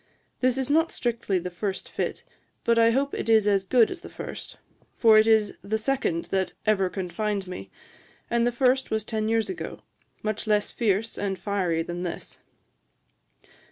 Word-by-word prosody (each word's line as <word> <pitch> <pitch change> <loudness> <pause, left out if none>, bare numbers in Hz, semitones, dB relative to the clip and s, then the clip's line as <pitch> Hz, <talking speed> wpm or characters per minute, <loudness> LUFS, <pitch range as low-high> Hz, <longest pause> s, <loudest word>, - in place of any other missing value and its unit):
This 255 0 +2
is 265 +1 -1
not 325 +2 +3
strictly 230 -5 -1
the 180 0 -4
first 190 +2 -4
fit, - - -3 0.4
but 230 0 +3
I 230 0 +6
hope 275 +4 +1
it - - -3
is 220 -2 +5
as 195 -2 +2
good 235 +2 +4
as 365 -2 -6
the - - -10
first; - - -8 0.4
for 225 -2 +6
it 215 - +4
is 220 -2 +4
the 215 +2 -1
second 220 -8 0
that 190 -2 0
ever 195 -4 +2
confined 200 +2 -2
me; 100 - -7 0.6
and 235 0 +2
the - - +2
first 260 +2 +2
was 220 0 -1
ten 220 -1 -1
years 225 -1 +1
ago, 370 - -6 0.4
much 215 0 -2
less 210 -1 +2
fierce 225 -1 0
and 195 -1 -1
fiery 185 -6 0
than 175 +1 -5
this.' 175 -2 -5
215 Hz, 175 wpm, -26 LUFS, 195-235 Hz, 0.6 s, I